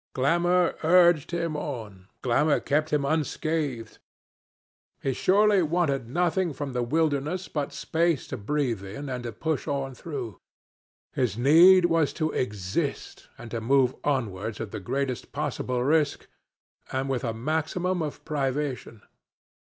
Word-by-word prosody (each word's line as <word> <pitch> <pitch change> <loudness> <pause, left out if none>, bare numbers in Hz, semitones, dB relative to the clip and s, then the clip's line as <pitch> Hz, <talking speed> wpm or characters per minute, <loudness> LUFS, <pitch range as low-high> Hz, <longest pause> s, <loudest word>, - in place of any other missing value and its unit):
Glamour 175 +6 +2
urged 170 -2 +5
him 170 -2 -2
on, 110 -11 -6 0.2
glamour 145 +5 +3
kept 155 +2 0
him 145 -2 +1
unscathed. 150 -5 -2 1.0
He 135 - -1
surely 200 +5 +4
wanted 155 -7 0
nothing 175 +3 0
from 140 -1 -5
the 125 - 0
wilderness 155 +6 0
but 145 -2 -3
space 165 -2 0
to 130 - -4
breathe 120 -2 -1
in 135 +9 -7
and 125 -1 -3
to 120 - -3
push 155 +8 -3
on 140 -2 -2
through. 125 - -6 0.7
His 120 -5 0
need 170 +8 +7
was 165 -3 +2
to 155 -1 -1
exist, 105 - -3
and 120 -3 -10
to 115 - -3
move 130 +2 +3
onwards 110 -7 -2
at 110 -3 -5
the - - -5
greatest 130 +5 -3
possible 125 -1 -2
risk, 150 +1 +1 0.7
and 130 +1 -1
with 130 -2 -2
a 115 - -1
maximum 160 +9 -1
of 150 -2 -5
privation. 135 -5 -3
140 Hz, 135 wpm, -26 LUFS, 125-160 Hz, 1.0 s, need